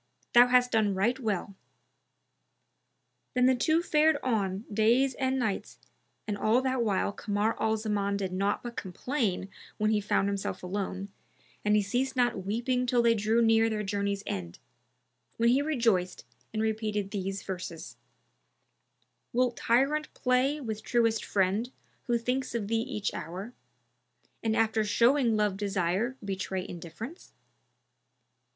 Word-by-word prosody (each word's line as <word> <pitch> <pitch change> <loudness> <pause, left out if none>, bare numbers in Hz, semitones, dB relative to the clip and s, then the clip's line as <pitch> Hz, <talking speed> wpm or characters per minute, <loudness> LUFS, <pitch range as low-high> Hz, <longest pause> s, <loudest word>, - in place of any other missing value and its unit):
Thou 240 0 +8
hast 250 0 +4
done 215 -3 +2
right 235 +7 +1
well.''[FN#298] 205 -4 -2 1.8
Then 250 0 +4
the 260 - +5
two 315 +7 +2
fared 310 -2 +3
on 205 -4 -1
days 235 +5 +3
and 260 +1 0
nights 220 -6 -2 0.5
and 210 - -1
all 215 +4 +3
that 260 -1 0
while 200 -3 +1
Kamar 205 +1 -1
al 220 0 +2
Zaman 205 -2 -1
did 190 -2 -3
naught 200 +2 0
but 240 -1 -6
complain 195 - -2 0.3
when 215 0 +1
he 210 -1 +2
found 200 -1 +1
himself 200 -2 -3
alone, 195 +1 -3 0.5
and 210 0 +3
he 210 - +3
ceased 255 +7 -1
not 240 -6 +1
weeping 245 +5 -1
till 240 -1 +3
they 230 0 +5
drew 220 +2 +2
near 225 0 +4
their 215 -1 -2
journeys 200 0 -2
end, 85 -3 -5 0.8
when 235 +1 +3
he 260 +3 +4
rejoiced 230 - 0 0.3
and 220 0 -1
repeated 215 -2 -1
these 195 -1 -3
verses, 180 -2 -6 1.4
"Wilt 245 -1 +1
tyrant 275 +7 +1
play 255 +4 +1
with 220 -5 -5
truest 230 -2 +1
friend 200 +5 0 0.4
who 240 -1 +2
thinks 250 +2 -2
of 215 -4 -2
thee 225 - +2
each 225 -5 -3
hour, 185 +9 -6 0.4
* 125 -1 -43
And 220 -1 +1
after 220 -1 +2
showing 235 +2 +3
love 210 -2 +1
desire 200 +5 -1
betray 190 -1 -3
indifference? 175 - -9
220 Hz, 145 wpm, -29 LUFS, 200-245 Hz, 1.8 s, Thou